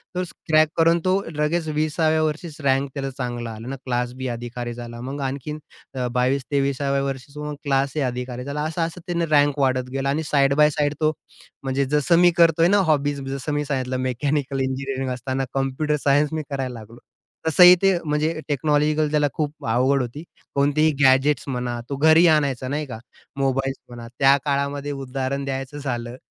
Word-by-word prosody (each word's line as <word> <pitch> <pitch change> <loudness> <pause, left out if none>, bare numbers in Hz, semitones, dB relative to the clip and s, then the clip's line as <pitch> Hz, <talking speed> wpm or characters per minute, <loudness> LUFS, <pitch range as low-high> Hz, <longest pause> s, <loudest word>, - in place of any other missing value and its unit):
तो 180 - 0
क्रॅक 155 -3 +1
करून, 165 +1 +4
तो 185 +1 +2
लगेच 155 +2 0
20सा 155 +1 +1
व्या 160 0 +2
वर्षीच 155 +1 -3
रँक 135 0 +1
त्याला 135 -1 -3
चांगला 120 -3 -4
आला 110 +1 -9
अन 135 - -4
क्लास 125 -1 -1
बी 130 +1 -5
अधिकारी 120 0 -5
झाला. 120 0 -8
मग 135 +3 -5
आणखीन 140 +3 -4 0.4
अ, 125 -1 -1
22-23सा 135 +2 0
व्या 140 0 +1
वर्षीच 135 +1 -5
मग 150 0 -5
क्लास 140 -1 0
ए - - +1
अधिकारी 125 0 -5
झाला. 140 +2 -4
असं, 160 +2 -2
असं 170 +2 -10
त्याने 170 -1 0
रँक 145 0 +3
वाढत 130 -2 +1
गेला. 135 +1 -1
आणि 150 +3 0
साइड 140 -1 +4
बाय 150 0 +5
साइड 150 -1 0
तो 155 0 +3 0.5
म्हणजे 135 +1 0
जसं 150 +4 +2
मी 175 0 +6
करतोय 165 -1 +5
ना 200 +3 +4
हॉबीज 145 -2 +1
जसं 135 +2 -3
मी 145 0 -1
सांगितलं 130 -2 -2
मेकॅनिकल 140 +1 -1
इंजिनिअरिंग 135 0 -2
असताना 130 +2 -3
कॉम्प्युटर 135 +3 0
सायन्स 145 +2 +3
मी 155 -1 -2
करायला 135 -3 -3
लागलो. 115 +2 -13 0.5
तसंही 180 +3 +8
ते 195 - +5
म्हणजे 155 +1 -1
टेक्नॉलॉजिकल 150 +1 +1
त्याला 150 -1 +3
खूप 150 -1 -4
आवड 130 +4 +2
होती. 125 +5 -6 0.3
कोणतीही 145 +3 +3
गॅजेट्स 135 +1 +4
म्हणा. 125 -2 -3
तो 140 - -2
घरी 160 +4 +5
आणायचा 140 -5 +2
नाही 150 +3 -2
का. 125 -5 -7 0.4
मोबाईल्स 135 0 0
म्हणा, 120 -1 -9
त्या 135 0 +6
काळामध्ये 140 0 -1
उदाहरण 135 0 -3
द्यायचं 135 +1 -4
झालं, 120 -4 -4
140 Hz, 180 wpm, -23 LUFS, 130-150 Hz, 0.5 s, तसंही